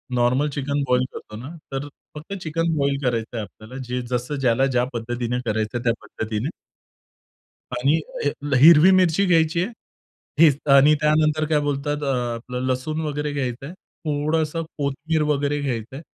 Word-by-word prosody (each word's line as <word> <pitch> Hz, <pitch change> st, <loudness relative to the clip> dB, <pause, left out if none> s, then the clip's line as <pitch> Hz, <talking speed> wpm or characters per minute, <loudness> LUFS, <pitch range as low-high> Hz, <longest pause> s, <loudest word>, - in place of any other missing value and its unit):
Normal 125 Hz, +5 st, +2 dB
chicken 140 Hz, 0 st, -2 dB
boil 125 Hz, 0 st, +3 dB
करतो 105 Hz, -, -9 dB
ना, 130 Hz, +6 st, -8 dB, 0.2 s
तर 135 Hz, +2 st, -3 dB, 0.3 s
फक्त 155 Hz, +6 st, -8 dB
चिकन 165 Hz, +1 st, -1 dB
बॉईल 140 Hz, -1 st, +1 dB
करायचंय 115 Hz, -2 st, -1 dB
आपल्याला. 110 Hz, +4 st, -10 dB
जे 125 Hz, 0 st, -3 dB
जसं 125 Hz, +3 st, -3 dB
ज्याला 130 Hz, +1 st, +3 dB
ज्या 125 Hz, -2 st, +1 dB
पद्धतीने 120 Hz, +1 st, -2 dB
करायचं 110 Hz, +2 st, -1 dB
आहे 120 Hz, -, -6 dB
त्या 115 Hz, -1 st, +3 dB
पद्धतीने. 110 Hz, +7 st, -4 dB, 1.3 s
आणि 140 Hz, +6 st, +2 dB, 0.2 s
हे 145 Hz, -, +2 dB, 0.3 s
हिरवी 165 Hz, +4 st, +8 dB
मिरची 185 Hz, +2 st, +3 dB
घ्यायची 165 Hz, -1 st, +3 dB
आहे, 225 Hz, -, -4 dB, 0.7 s
हेच 145 Hz, -4 st, +6 dB, 0.2 s
आणि 145 Hz, +3 st, +6 dB
त्यानंतर 155 Hz, 0 st, +2 dB
काय 150 Hz, -1 st, +3 dB
बोलतात 145 Hz, +1 st, -2 dB
अ, 135 Hz, -, 0 dB, 0.2 s
आपलं 125 Hz, +2 st, -5 dB
लसूण 155 Hz, +5 st, -2 dB
वगैरे 150 Hz, 0 st, -2 dB
घ्यायचंय, 135 Hz, +2 st, -3 dB, 0.3 s
थोडंसं 155 Hz, +2 st, 0 dB
कोथिंबीर 145 Hz, +3 st, -1 dB
वगैरे 145 Hz, +1 st, -1 dB
घ्यायचंय 130 Hz, +1 st, -4 dB
140 Hz, 150 wpm, -23 LUFS, 125-155 Hz, 1.3 s, हिरवी